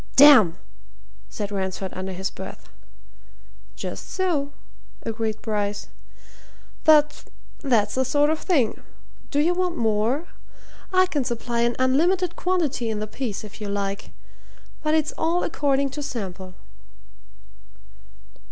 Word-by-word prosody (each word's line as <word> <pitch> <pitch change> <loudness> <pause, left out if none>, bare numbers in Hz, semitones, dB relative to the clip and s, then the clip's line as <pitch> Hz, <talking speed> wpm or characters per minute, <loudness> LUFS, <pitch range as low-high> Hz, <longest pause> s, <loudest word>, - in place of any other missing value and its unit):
"Damn!" 265 - +8 0.7
said 205 - -5
Ransford 190 -1 -3
under 185 +1 -4
his 190 +1 -3
breath. - - -9 1.1
"Just - - -6
so," 325 -7 0 0.5
agreed 220 -1 -2
Bryce. 205 -2 -2 0.9
"But 300 -1 +4 0.3
that's 225 -7 +2
the 260 - +1
sort 290 +3 +3
of 315 - -1
thing. 275 - +1 0.5
Do 285 - 0
you 330 +4 +3
want 360 -1 -1
more? 225 +7 +1 0.7
I 370 0 +5
can 295 -7 -1
supply 235 -1 -2
an 235 0 +2
unlimited 340 +7 +2
quantity 310 -10 0
in 220 - -2
the 210 - -2
piece 215 -1 -4
if 215 0 -11
you 205 - -4
like. 200 0 -3 0.7
But 310 0 +2
it's 310 -1 +1
all 335 +2 +1
according 280 -3 +1
to 295 - -5
sample." 190 -9 -6
260 Hz, 125 wpm, -24 LUFS, 210-305 Hz, 1.1 s, Damn